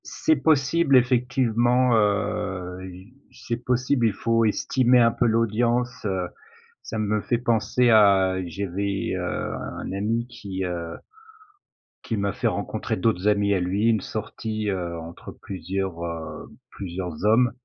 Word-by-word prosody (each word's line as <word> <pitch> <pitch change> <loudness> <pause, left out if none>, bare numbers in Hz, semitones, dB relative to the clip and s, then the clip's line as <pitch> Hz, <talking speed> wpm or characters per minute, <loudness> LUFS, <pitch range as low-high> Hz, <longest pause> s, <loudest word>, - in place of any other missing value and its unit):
C'est 315 - +1
possible 145 - +3
effectivement, 125 0 +2
heu, 95 -3 -1
i 95 +7 -14 0.2
c'est 120 -2 -4
possible, 125 0 +1
il 110 - 0
faut 115 +3 +1
estimer 125 +3 +3
un 115 -1 +5
peu 120 - 0
l'audience, 115 +2 +1
heu 95 -3 -1 0.6
ça 115 - -5
me 105 0 0
fait 120 - 0
penser 120 0 +2
à 100 -4 +5
j'avais, 100 +3 -3
heu, 90 - -3 0.3
un - - -6
ami 110 +5 -1
qui, 100 -6 -5
heu 85 -2 -4 1.1
qui 115 - -2
m'a 100 0 -1
fait - - -1
rencontrer - - -2
d'autres 100 -1 0
amis 100 -1 +3
à 95 - +1
lui. 95 +5 0
Une 110 -3 +3
sortie, 110 +1 -4
heu, 90 -3 -3
entre 80 +1 -9
plusieurs, 95 -1 -4
heu, 85 -1 -6 0.2
plusieurs 90 -3 -6
hommes. 115 +3 +4
105 Hz, 140 wpm, -24 LUFS, 95-120 Hz, 1.1 s, un